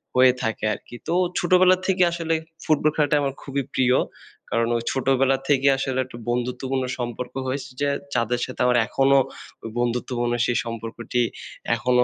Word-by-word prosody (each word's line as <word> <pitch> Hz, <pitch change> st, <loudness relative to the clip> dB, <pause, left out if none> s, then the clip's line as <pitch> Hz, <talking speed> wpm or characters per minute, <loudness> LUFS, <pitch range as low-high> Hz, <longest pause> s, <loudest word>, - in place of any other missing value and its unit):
হয়ে 130 Hz, 0 st, +6 dB
থাকে 110 Hz, -1 st, -2 dB
আরকি। 120 Hz, -, -10 dB
তো 170 Hz, -, 0 dB, 0.3 s
ছোটবেলা 185 Hz, +1 st, +5 dB
থেকে 185 Hz, -1 st, +3 dB
আসলে 165 Hz, -1 st, -1 dB, 0.3 s
ফুটবল 155 Hz, -1 st, +3 dB
খেলাটা 150 Hz, -1 st, +2 dB
আমার 135 Hz, -1 st, -1 dB
খুবই 140 Hz, -1 st, -2 dB
প্রিয়। 125 Hz, 0 st, +3 dB, 0.5 s
কারণ 115 Hz, 0 st, +1 dB
ওই 115 Hz, -, -4 dB
ছোটবেলা 135 Hz, 0 st, +2 dB
থেকেই 140 Hz, -1 st, +4 dB
আসলে 130 Hz, -1 st, -1 dB
একটা 120 Hz, -, -11 dB
বন্ধুত্বপূর্ণ 125 Hz, +2 st, -1 dB, 0.2 s
সম্পর্ক 120 Hz, +1 st, -4 dB
হয়েছে, 130 Hz, 0 st, -3 dB
যে 145 Hz, 0 st, +1 dB, 0.3 s
যাদের 120 Hz, +1 st, +1 dB
সাথে 130 Hz, -, -6 dB
আমার 125 Hz, -1 st, +4 dB
এখনো 135 Hz, 0 st, +3 dB, 0.5 s
ওই 115 Hz, -, -5 dB
বন্ধুত্বপূর্ণ 120 Hz, 0 st, -1 dB
সেই 125 Hz, -, +1 dB
সম্পর্কটি, 115 Hz, +1 st, -3 dB, 0.5 s
এখনো 125 Hz, +1 st, +3 dB
130 Hz, 155 wpm, -23 LUFS, 120-140 Hz, 0.5 s, হয়ে